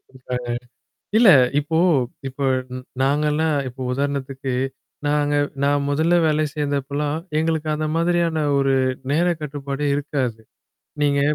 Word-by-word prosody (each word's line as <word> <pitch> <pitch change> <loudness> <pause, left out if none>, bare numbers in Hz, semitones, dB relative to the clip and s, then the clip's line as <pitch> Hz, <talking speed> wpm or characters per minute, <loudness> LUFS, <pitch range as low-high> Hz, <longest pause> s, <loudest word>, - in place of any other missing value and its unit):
குடுக்குறாங்க. 125 -2 -6 0.7
இல்ல 230 -3 +6 0.3
இப்போ 160 +2 -1 0.5
இப்ப 135 +1 -3 0.6
நாங்கலாம் 150 +2 +1
இப்போ 130 +1 -12
உதாரணத்துக்கு 135 -1 -2 0.5
நாங்க 145 0 +1 0.3
நான் 145 0 +2
முதல்ல 160 +4 +2
வேலைக்கு 150 -1 0
சேந்தப்பலாம் 145 +1 -1 0.2
எங்களுக்கு 160 -1 0
அந்த 155 0 -2
மாதிரியான 170 -2 +1
ஒரு 135 -1 +2 0.4
நேர 170 +4 +2 0.2
கட்டுப்பாடே 140 0 -3
இருக்காது. 135 -6 -2 0.6
நீங்க 140 -1 +2
145 Hz, 105 wpm, -22 LUFS, 140-155 Hz, 0.7 s, இல்ல